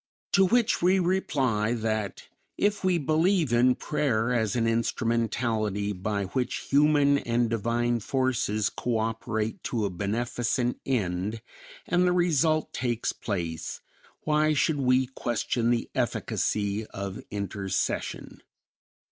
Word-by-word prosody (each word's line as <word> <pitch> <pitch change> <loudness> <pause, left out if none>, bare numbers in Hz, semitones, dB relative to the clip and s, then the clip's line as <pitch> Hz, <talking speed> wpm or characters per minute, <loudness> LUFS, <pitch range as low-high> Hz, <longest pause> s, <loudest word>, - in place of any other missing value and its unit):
To 195 -1 +5
which 235 +2 +2
we 185 +2 +4
reply 135 - +1
that 110 -3 -2 0.3
if 205 0 +1
we 185 -2 +3
believe 160 0 +2
in 125 +1 +4
prayer 125 -6 0
as 110 -3 0
an 115 -2 +1
instrumentality 115 -3 0
by 100 +2 -2
which 125 +6 -2
human 145 0 +4
and 120 -1 0
divine 120 +2 0
forces 115 -3 0
cooperate 115 -1 -2
to 115 -4 -1
a 100 - -2
beneficent 120 +6 -1
end, 105 -2 -1 0.4
and 180 +1 +2
the 180 - +3
result 160 -3 +2
takes 120 -2 -1
place, 85 -6 -4 0.4
why 155 0 +2
should 150 0 +1
we 130 0 +3
question 120 -2 -1
the 120 -1 +1
efficacy 105 +1 -1
of 100 0 -6
intercession? 100 -2 -3
120 Hz, 115 wpm, -27 LUFS, 110-145 Hz, 0.4 s, To